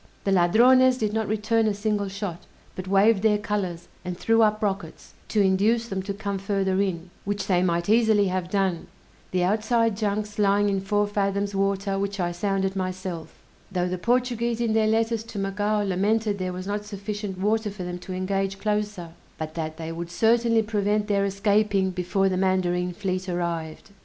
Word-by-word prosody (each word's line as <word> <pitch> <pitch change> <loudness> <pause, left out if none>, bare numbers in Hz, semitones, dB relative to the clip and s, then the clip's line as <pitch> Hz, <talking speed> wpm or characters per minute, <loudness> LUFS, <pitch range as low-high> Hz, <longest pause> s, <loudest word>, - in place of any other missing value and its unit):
The 195 - 0
Ladrones 250 +8 +5
did 215 -3 -1
not 220 -1 -1
return 220 +1 +1
a 210 - 0
single 205 -1 -1
shot, 195 -3 -6 0.3
but 185 0 -6
waved 195 +2 +4
their 215 -1 +3
colors, 185 -5 -3 0.2
and 180 -1 -5
threw 225 +4 +3
up 215 0 +2
rockets, 195 -5 -4
to 215 - +1
induce 210 +5 +2
them 195 -1 -2
to 200 +1 -4
come 200 -1 -3
further 195 -1 0
in, 180 -3 -3
which 200 -1 -2
they 180 -3 +2
might 170 -1 0
easily 220 -2 +4
have 185 -1 -2
done, 190 -3 0 0.4
the 180 -1 0
outside 220 +3 +2
junks 210 0 -2
lying 205 0 +3
in 195 -1 0
four 205 +2 +1
fathoms 200 0 -1
water 195 0 0
which 200 0 -3
I 175 -1 0
sounded 195 +2 -1
myself: 185 -3 -4 0.3
though 180 -1 0
the 180 0 -3
Portuguese 240 0 0
in 230 -2 +1
their 220 -1 +3
letters 225 0 +1
to 230 - -9
Macao 205 +2 0
lamented 205 +2 0
there 185 0 -2
was 185 +1 -6
not 205 +1 -2
sufficient 205 -1 -5
water 210 +3 0
for 195 -2 -7
them 180 0 -5
to 185 - -9
engage 195 +1 -1
closer, 210 -4 -2 0.3
but 155 0 -5
that 155 -1 -4
they 165 0 -5
would 170 +1 -5
certainly 230 +4 +3
prevent 210 0 0
their 200 -1 +2
escaping 200 -1 +1
before 185 +2 0
the 185 -1 0
mandarine 180 -1 +1
fleet 185 0 -3
arrived! 170 +1 -3
200 Hz, 180 wpm, -25 LUFS, 185-210 Hz, 0.4 s, Ladrones